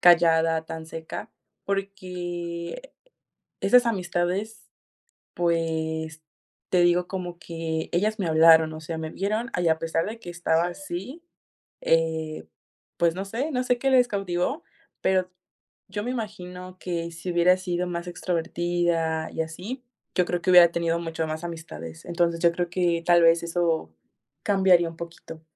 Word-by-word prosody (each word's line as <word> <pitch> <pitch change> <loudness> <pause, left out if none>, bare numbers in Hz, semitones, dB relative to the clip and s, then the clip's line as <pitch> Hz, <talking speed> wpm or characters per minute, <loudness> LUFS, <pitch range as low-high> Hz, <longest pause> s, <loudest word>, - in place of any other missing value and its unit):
callada, 165 -2 +5
tan 160 0 -7
seca, 165 +7 -7 0.3
porque, 180 - -4 0.7
esas 250 0 +5
amistades, 190 +1 -2 0.7
pues, 160 -2 -1 0.5
te 180 - +4
digo, 175 0 +4
como 180 -2 -5
que 165 -2 -4
ellas 210 +5 +1
me 195 - -1
hablaron, 160 0 +6
o 155 - -7
sea, 160 +1 -5
me 160 0 -4
vieron, 215 +6 -2
y 170 - +3
a 160 0 +3
pesar 165 0 -1
de 220 +2 -5
que 180 -6 -8
estaba 170 -1 +1
así, 295 - -6 0.6
eh, 160 - 0 0.5
pues 170 -1 +3
no 190 - -3
sé 245 +10 -3
no 250 -2 0
sé 250 -1 +2
qué 270 +3 +1
les 250 -2 +5
cautivó, 195 - -1 0.4
pero, 185 -1 +2 0.6
yo 205 - -4
me 245 - -2
imagino 185 -6 -6
que, 170 -2 -3
si 170 +2 -5
hubiera 175 +1 +5
sido 180 -1 -2
más 170 0 -4
extrovertida 170 -2 -1
y - - -2
así, 185 +11 -6 0.3
yo 180 - +3
creo 175 0 -1
que 185 - +2
hubiera 175 -2 +9
tenido 170 0 0
mucho 165 -1 -3
más 155 +1 -4
amistades, 85 - -8
entonces 170 -1 0
yo 170 -1 +5
creo 175 +1 -2
que 175 -2 +1
tal 175 -1 +6
vez 165 0 +6
eso, 170 - 0 0.5
cambiaría 190 -4 +4
un 165 - -11
poquito. 170 -1 -9
175 Hz, 150 wpm, -26 LUFS, 165-190 Hz, 0.7 s, hubiera